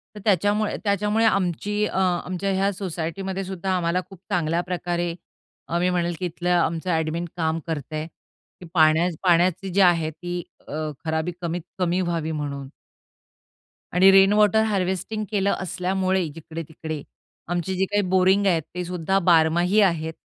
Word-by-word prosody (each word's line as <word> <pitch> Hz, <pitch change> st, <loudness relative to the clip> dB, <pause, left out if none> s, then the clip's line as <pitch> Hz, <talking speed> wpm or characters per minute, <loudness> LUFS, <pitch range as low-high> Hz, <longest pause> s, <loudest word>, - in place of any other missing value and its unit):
तर -, -, -7 dB
त्याच्यामुळे 205 Hz, +2 st, +2 dB
त्याच्यामुळे 210 Hz, +2 st, +1 dB
आमची 205 Hz, +1 st, +1 dB
अ, 190 Hz, -, -2 dB
आमच्या 185 Hz, +1 st, 0 dB
ह्या 195 Hz, +1 st, +1 dB
सोसायटीमध्येसुद्धा 190 Hz, +1 st, -4 dB
आम्हाला 175 Hz, 0 st, 0 dB
खूप 195 Hz, -3 st, -13 dB
चांगल्याप्रकारे 175 Hz, +1 st, -1 dB, 0.5 s
अ, 170 Hz, -, -1 dB
मी 180 Hz, +1 st, +2 dB
म्हणेल, 175 Hz, -1 st, 0 dB
की 185 Hz, -, -2 dB
इथलं 175 Hz, +1 st, -3 dB
आमचं 170 Hz, 0 st, +1 dB
ॲडमिन 160 Hz, +1 st, -1 dB
काम 160 Hz, -1 st, 0 dB
करतं 155 Hz, -2 st, -4 dB
आहे 155 Hz, +1 st, -3 dB, 0.5 s
की -, -, -8 dB
पाण्या 160 Hz, 0 st, +4 dB, 0.2 s
पाण्याची 180 Hz, +1 st, +3 dB
जी 195 Hz, +2 st, +2 dB
आहे 170 Hz, -4 st, +4 dB
ती 175 Hz, +2 st, -5 dB, 0.3 s
अ, -, -, -8 dB, 0.3 s
खराबी 160 Hz, +2 st, -1 dB
कमीत 170 Hz, 0 st, -2 dB, 0.2 s
कमी 180 Hz, 0 st, +1 dB
व्हावी 165 Hz, -3 st, -2 dB
म्हणून. 140 Hz, -3 st, -4 dB, 1.3 s
आणि 185 Hz, +2 st, +6 dB
रेनवॉटर 205 Hz, +2 st, +5 dB
हार्वेस्टिंग 195 Hz, +1 st, -1 dB
केलं 200 Hz, -1 st, +1 dB
असल्यामुळे 185 Hz, 0 st, -1 dB
जिकडे-तिकडे, 160 Hz, -1 st, -7 dB, 0.5 s
आमची 175 Hz, +2 st, -2 dB
जी 190 Hz, +1 st, +1 dB
काही 205 Hz, 0 st, +3 dB
बोरिंग 190 Hz, +2 st, +4 dB
आहेत, 170 Hz, -4 st, +3 dB
ते 180 Hz, -, -2 dB
सुद्धा 180 Hz, +2 st, 0 dB
बारमाही 175 Hz, +3 st, +3 dB
आहेत. 165 Hz, -4 st, +1 dB
180 Hz, 140 wpm, -24 LUFS, 165-190 Hz, 1.3 s, आणि